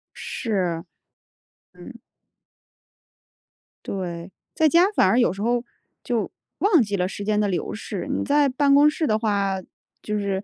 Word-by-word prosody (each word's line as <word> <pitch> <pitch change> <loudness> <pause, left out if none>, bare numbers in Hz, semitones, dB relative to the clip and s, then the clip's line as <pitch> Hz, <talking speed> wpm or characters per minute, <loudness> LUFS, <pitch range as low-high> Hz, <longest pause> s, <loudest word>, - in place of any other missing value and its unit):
是。 180 -8 -2 0.9
嗯。 - - -12 1.9
对， 175 -2 -5 0.2
在 315 - +4
家 345 +5 +5
反 - - +4
而 225 +6 +3
有 240 - +3
时 195 - -7
候， 240 +2 +1 0.4
就 235 -3 -2 0.3
忘 395 -7 +4
记 205 -3 -1
了 180 -2 0
时 200 +1 -6
间 210 0 +1
的 210 - +2
流 180 - -2
逝， 210 -1 -6
你 275 - -1
在 290 0 +3
办 275 +2 +2
公 290 +1 +6
室 310 +1 -2
的 215 -5 +1
话， 200 -3 0 0.4
就 210 0 -3
是 200 -2 -2
215 Hz, 160 characters per minute, -23 LUFS, 195-275 Hz, 1.9 s, 公